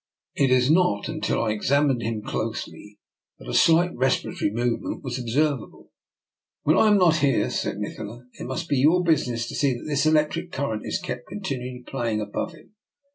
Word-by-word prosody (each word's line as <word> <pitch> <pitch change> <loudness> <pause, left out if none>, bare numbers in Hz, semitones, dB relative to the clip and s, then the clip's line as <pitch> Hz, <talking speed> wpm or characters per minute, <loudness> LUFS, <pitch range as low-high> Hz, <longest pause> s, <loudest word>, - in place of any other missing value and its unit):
It 135 - +2
was 130 +2 +4
not 160 - +2
until - - -1
I 110 - 0
examined 135 +4 +2
him 110 -1 -3
closely 105 0 -5 0.4
that - - -13
a 60 - -4
slight 170 +2 +4
respiratory 130 -4 0
movement 120 +2 -2
was 130 -1 -3
observ 135 +4 +1
able. - - -15 0.4
" - - -68
When 155 - +4
I 220 - +5
am 210 -1 +5
not 170 -4 +4
here," 140 -4 +2
said - - -2
Nikola, 105 +3 -6
" - - -41
it - - -5
must 130 +6 -4
be 140 - +1
your 160 +7 +4
business 125 -8 +1
to - - -7
see 140 -4 +1
that 120 - -9
this 145 0 +1
electric 155 +3 +1
current 115 -6 -3
is - - -1
kept 125 0 -6
continually 130 -10 -5
playing 115 -3 -2
above 105 -1 -4
him. - - -18
130 Hz, 190 wpm, -24 LUFS, 115-155 Hz, 0.4 s, I